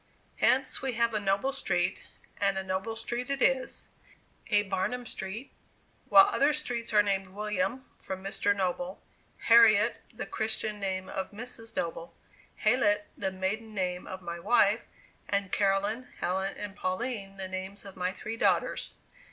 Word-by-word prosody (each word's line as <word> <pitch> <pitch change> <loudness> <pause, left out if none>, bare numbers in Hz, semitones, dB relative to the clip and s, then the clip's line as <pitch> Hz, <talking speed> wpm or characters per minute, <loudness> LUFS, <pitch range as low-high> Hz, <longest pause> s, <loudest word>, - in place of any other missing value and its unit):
Hence, 260 0 +3
we 265 -1 -1
have 235 0 +2
a 215 - +1
"Noble" 200 +7 +1
Street 180 -9 -1 0.3
and 195 -1 +2
a 190 - -1
noble 190 +4 -2
street 240 +3 -4
it 275 0 0
is; 265 -1 +1 0.6
a 205 -1 +4
"Barnum" 200 +6 -2
Street; 215 +4 -5 0.6
while 390 - +9
other 300 -7 +3
streets 245 -6 -3
are 210 -1 +6
named 195 -1 0
"William," 210 +5 -2
from 190 0 -6
Mr. 200 +1 +1
Noble; 180 -1 -2 0.4
"Harriet," 230 -1 +6
the 240 - -5
Christian 220 -1 -2
name 190 -1 -2
of 190 - -4
Mrs. 225 +1 -7
Noble; 165 0 -3 0.4
"Hallett," 210 -3 +2
the 190 -1 -2
maiden 210 +4 -3
name 180 -2 -2
of 185 0 -7
my 170 0 -5
wife; 215 +2 +4 0.5
and 200 -2 0
"Caroline," 205 +5 +1
"Helen," 190 +2 -1
and 205 -1 -6
"Pauline," 195 0 -3
the 190 -1 -4
names 190 +2 -6
of 195 - -10
my 180 0 -1
three 220 +4 -6
daughters. - - +1
205 Hz, 150 wpm, -30 LUFS, 190-230 Hz, 0.6 s, while